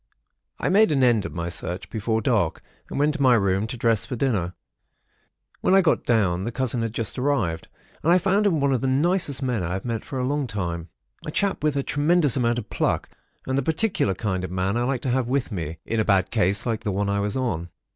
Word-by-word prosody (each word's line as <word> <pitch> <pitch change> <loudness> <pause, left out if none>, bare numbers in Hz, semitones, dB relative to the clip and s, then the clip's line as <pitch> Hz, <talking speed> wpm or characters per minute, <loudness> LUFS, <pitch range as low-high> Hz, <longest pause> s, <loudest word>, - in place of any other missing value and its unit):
"I - - -2
made 205 0 +5
an 135 -3 +2
end 115 -5 +3
of - - -10
my 85 0 -3
search, 90 +2 -4
before 110 0 -1
dark, 105 -9 0 0.3
and - - -5
went 150 +2 +2
to 150 - -4
my 130 -3 +6
room 100 0 +1
to 125 +2 -5
dress 115 -2 +2
for 125 - -5
dinner. 105 -9 -1 1.0
When 190 - +3
I 195 - +7
got 165 -3 +1
down, 95 -6 +2
the 115 - -3
cousin 125 -1 -1
had 115 -1 -2
just 115 +2 -2
arrived; 125 - 0 0.3
and 165 - +2
I 180 - +7
found 195 +3 +2
him 165 -6 +2
one 140 -1 +2
of 125 - 0
the 135 - 0
nicest 145 +1 +1
men 125 -5 0
I 85 0 -2
have 95 +4 -4
met 115 -2 -2
for 135 - -6
a 125 - 0
long 145 0 -1
time. 85 -5 -4 0.3
A - - -5
chap 195 +1 -1
with 150 -2 +1
a 140 - 0
tremendous 150 0 +2
amount 120 -2 +1
of 110 -3 -6
pluck, - - 0 0.4
and 130 +1 0
the - - +1
particular 160 - 0
kind 95 -2 -2
of 95 - -4
man 95 +3 -1
I 120 +1 +1
like 130 -1 -1
to 130 - -1
have 130 -1 +1
with 130 -1 -1
me, 80 -5 -4
in 115 - -1
a - - +3
bad 95 -3 +2
case 100 -3 +1
like 115 -3 -1
the 105 - -1
one 100 +1 -1
I 100 0 0
was 105 +3 -1
on. 90 -10 -2
120 Hz, 245 wpm, -24 LUFS, 100-140 Hz, 1.0 s, I